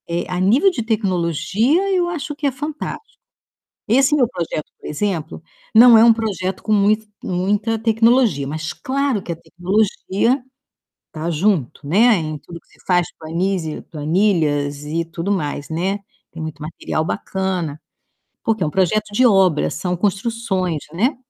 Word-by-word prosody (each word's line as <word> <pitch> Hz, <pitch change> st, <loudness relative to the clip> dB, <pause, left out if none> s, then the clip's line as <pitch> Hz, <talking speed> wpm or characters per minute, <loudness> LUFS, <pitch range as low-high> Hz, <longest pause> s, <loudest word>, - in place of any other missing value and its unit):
Eh, 170 Hz, +1 st, -2 dB
a 180 Hz, 0 st, -2 dB
nível 245 Hz, -, +4 dB
de 235 Hz, -, -3 dB
tecnologia, 215 Hz, -, +1 dB
eu 350 Hz, -1 st, +1 dB
acho 310 Hz, -3 st, -4 dB
que 290 Hz, 0 st, -1 dB
é -, -, +1 dB
fantástico. 300 Hz, -, -6 dB, 0.7 s
Esse 270 Hz, +6 st, +4 dB
meu 255 Hz, -6 st, +3 dB
projeto, 170 Hz, -5 st, -4 dB
por -, -, -12 dB
exemplo, 160 Hz, -1 st, -3 dB, 0.3 s
não 235 Hz, +1 st, +9 dB
é 220 Hz, -, +7 dB
um 235 Hz, -, +8 dB
projeto 195 Hz, -5 st, -3 dB
com 215 Hz, -, -1 dB
mui 210 Hz, +1 st, +4 dB, 0.2 s
muita 205 Hz, +5 st, 0 dB
tecnologia, 225 Hz, -, +3 dB
mas 155 Hz, +2 st, -4 dB
claro 275 Hz, -5 st, -1 dB
que 175 Hz, -, -5 dB
a -, -, -5 dB
tecnologia 200 Hz, -, 0 dB, 0.7 s
tá 160 Hz, +2 st, -4 dB
junto, 160 Hz, -, 0 dB
né. 220 Hz, +9 st, +5 dB
Em 155 Hz, -2 st, -3 dB
tudo 170 Hz, +4 st, -11 dB
que -, -, -37 dB
se -, -, -24 dB
faz, 180 Hz, -2 st, +2 dB
planizi 165 Hz, 0 st, -2 dB
planilhas 150 Hz, -3 st, 0 dB
e 165 Hz, +3 st, -2 dB
tudo 165 Hz, +3 st, -4 dB
mais, 145 Hz, -6 st, -2 dB
né. 185 Hz, +5 st, -1 dB, 0.3 s
Tem 165 Hz, -, -8 dB
muito 155 Hz, -1 st, -6 dB
material 155 Hz, 0 st, -3 dB
bacana, 180 Hz, -5 st, -3 dB, 0.6 s
porque 220 Hz, -3 st, 0 dB
é -, -, +2 dB
um -, -, -2 dB
projeto 205 Hz, +4 st, 0 dB
de 250 Hz, +5 st, +4 dB
obras; 190 Hz, -8 st, +3 dB
são 180 Hz, -1 st, -2 dB
construções, 195 Hz, -4 st, -1 dB
né. 235 Hz, -, +1 dB
190 Hz, 155 wpm, -20 LUFS, 165-225 Hz, 0.7 s, não